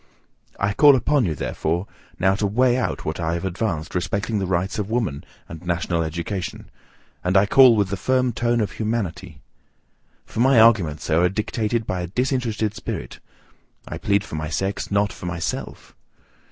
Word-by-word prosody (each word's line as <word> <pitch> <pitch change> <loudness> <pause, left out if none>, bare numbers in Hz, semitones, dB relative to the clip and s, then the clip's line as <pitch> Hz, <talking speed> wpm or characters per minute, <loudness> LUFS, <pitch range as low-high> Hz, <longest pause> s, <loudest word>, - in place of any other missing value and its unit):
I 100 0 +1
call 145 +5 +7
upon 140 0 +2
you, 80 -4 -1
therefore, 85 +6 -2 0.3
now 95 +1 +3
to 100 +1 0
weigh 125 +4 +2
what 80 -8 -3
I 85 0 -1
have 85 - -4
advanced 85 -4 -3
respecting 100 +4 -1
the 95 - -2
rights 95 +4 -1
of 105 0 -3
woman, 110 - -1 0.2
and 80 0 -10
national 85 -1 -1
education; 85 +4 -4 0.5
and 90 +2 +2
I 95 - +5
call 125 +2 +7
with 100 -3 +1
the 100 - -2
firm 130 +4 +1
tone 120 0 +1
of 105 - -1
humanity. 95 -8 -4 0.8
For - - -7
my 130 0 +5
arguments, 100 -10 +4
sir, 85 +2 +2
are 90 - +4
dictated 110 +3 -2
by 95 -3 -2
a 90 - -4
disinterested 115 -1 -1
spirit: - - -6 0.7
I - - -6
plead 100 0 +1
for - - -12
my 80 0 -3
sex, 95 +5 -2
not 100 0 +1
for 90 - -8
myself. 85 -1 -5
100 Hz, 170 wpm, -22 LUFS, 85-115 Hz, 0.8 s, call